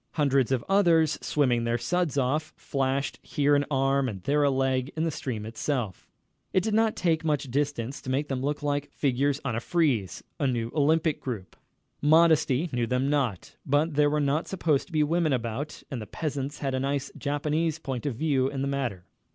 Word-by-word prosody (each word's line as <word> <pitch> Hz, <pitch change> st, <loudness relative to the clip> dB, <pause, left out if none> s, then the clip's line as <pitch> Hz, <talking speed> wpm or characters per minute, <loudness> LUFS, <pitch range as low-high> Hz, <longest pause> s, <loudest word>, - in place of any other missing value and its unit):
Hundreds 140 Hz, -4 st, +2 dB
of 130 Hz, -3 st, 0 dB
others, 170 Hz, -6 st, +3 dB
swimming 125 Hz, -5 st, +1 dB
their 115 Hz, 0 st, +1 dB
suds 175 Hz, +2 st, -1 dB
off, 145 Hz, +4 st, 0 dB
flashed 135 Hz, 0 st, -1 dB
here 145 Hz, 0 st, +2 dB
an 145 Hz, -, +3 dB
arm 135 Hz, -1 st, +2 dB
and 95 Hz, -5 st, -7 dB
there 145 Hz, +7 st, +2 dB
a 145 Hz, -, +4 dB
leg 130 Hz, 0 st, 0 dB
in 160 Hz, -, +1 dB
the 165 Hz, -, 0 dB
stream 115 Hz, -7 st, -4 dB
itself. 115 Hz, -, -3 dB, 0.4 s
It 185 Hz, -, +3 dB
did 220 Hz, -, -1 dB
not 220 Hz, 0 st, +3 dB
take 165 Hz, -3 st, +1 dB
much 145 Hz, -4 st, -1 dB
distance 140 Hz, -2 st, -2 dB
to -, -, -7 dB
make 140 Hz, +3 st, 0 dB
them 135 Hz, -2 st, -2 dB
look 145 Hz, +2 st, -2 dB
like 145 Hz, 0 st, -1 dB
figures 140 Hz, +1 st, 0 dB
on 120 Hz, -5 st, -1 dB
a -, -, 0 dB
frieze, 130 Hz, -, 0 dB, 0.2 s
a 140 Hz, -, +2 dB
new 120 Hz, -2 st, -1 dB
Olympic 155 Hz, +1 st, +2 dB
group. 110 Hz, -8 st, -5 dB, 0.5 s
Modesty 160 Hz, -1 st, +4 dB
knew 120 Hz, -1 st, 0 dB
them 130 Hz, +3 st, 0 dB
not, 130 Hz, -11 st, -1 dB
but 145 Hz, +3 st, +1 dB
there 145 Hz, 0 st, +4 dB
were 150 Hz, +1 st, +1 dB
not 145 Hz, +3 st, 0 dB
supposed 160 Hz, -7 st, 0 dB
to -, -, -18 dB
be 155 Hz, -2 st, +2 dB
women 160 Hz, 0 st, +1 dB
about, 125 Hz, +4 st, -3 dB
and 125 Hz, -4 st, -4 dB
the 105 Hz, -, -7 dB
peasants 145 Hz, -2 st, -4 dB
had 135 Hz, -2 st, -2 dB
a 130 Hz, -, 0 dB
nice 140 Hz, 0 st, -2 dB
Japanese 150 Hz, +3 st, -1 dB
point 135 Hz, -3 st, -4 dB
of 135 Hz, -, -2 dB
view 135 Hz, -1 st, +1 dB
in 135 Hz, -1 st, -3 dB
the -, -, -1 dB
matter. 125 Hz, -10 st, -2 dB
140 Hz, 200 wpm, -27 LUFS, 130-150 Hz, 0.5 s, a